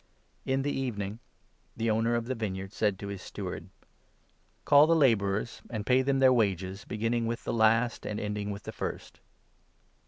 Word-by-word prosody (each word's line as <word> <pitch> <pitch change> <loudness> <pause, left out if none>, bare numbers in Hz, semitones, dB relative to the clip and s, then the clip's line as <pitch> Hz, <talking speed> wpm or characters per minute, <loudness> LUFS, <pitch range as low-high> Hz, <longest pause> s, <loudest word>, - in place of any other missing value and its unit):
In 135 0 +1
the 145 - 0
evening 110 -6 -3 0.6
the 115 0 +1
owner 115 +2 +1
of 115 -1 -1
the 130 - -2
vineyard 95 -4 -4
said 105 -3 +1
to 100 +1 -6
his 100 -2 -6
steward - - -6
8 - - -19 0.6
' - - -40
Call 145 +1 +7
the 165 - +4
labourers, 110 -6 +2
and 110 -3 -4
pay 130 +2 +4
them 135 +1 +1
their 130 -1 +6
wages, 95 -4 0
beginning 115 +2 -1
with 115 0 -3
the - - -2
last, 115 +1 +3
and 105 - -3
ending 105 0 -3
with 100 0 -6
the - - -6
first.' - - -6
115 Hz, 185 wpm, -29 LUFS, 100-125 Hz, 0.6 s, Call